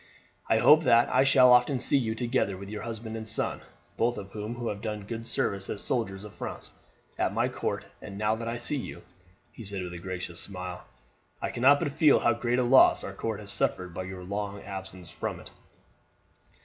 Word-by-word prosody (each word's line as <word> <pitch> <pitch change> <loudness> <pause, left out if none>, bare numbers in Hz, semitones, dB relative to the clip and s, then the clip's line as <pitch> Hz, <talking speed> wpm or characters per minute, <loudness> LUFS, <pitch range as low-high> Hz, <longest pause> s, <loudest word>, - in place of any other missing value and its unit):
I - - +4
hope 150 +1 +7
that 120 -1 +4
I 130 +1 +5
shall 130 -2 +6
often 125 +2 +4
see - - +1
you 110 -3 -2
together 120 -5 0
with 100 +1 -9
your 105 - -5
husband 115 -1 -6
and 110 -1 -6
son, 110 - +1 0.4
both 120 +1 +1
of 100 -1 -8
whom 105 +2 -5
have 100 -2 -4
done 105 -1 -4
good 115 +1 -6
service 100 -3 -1
as 100 - -1
soldiers 100 -6 -1
of 105 - -10
France, - - -7 0.5
at - - 0
my - - +2
court; - - -3 0.2
and 100 - -8
now 105 +1 +1
that 115 0 -5
I 115 +1 -2
see 130 +5 0
you," 130 - -7 0.5
he 115 - -11
said 100 -2 -4
with 90 -1 -6
a 90 - -7
gracious 90 -1 -5
smile, 90 -2 -6 0.5
"I - - -3
cannot 135 +4 +5
but 145 - -1
feel 150 0 +4
how 120 - +3
great 120 +1 -1
a 125 - +2
loss 130 +2 +6
our - - -6
court - - -4
has - - -3
suffered 90 -2 -1
by 95 +1 -5
your 95 -1 -8
long 100 +1 -4
absence 95 -2 -7
from - - -4
it." - - -12
110 Hz, 210 wpm, -28 LUFS, 95-120 Hz, 0.5 s, hope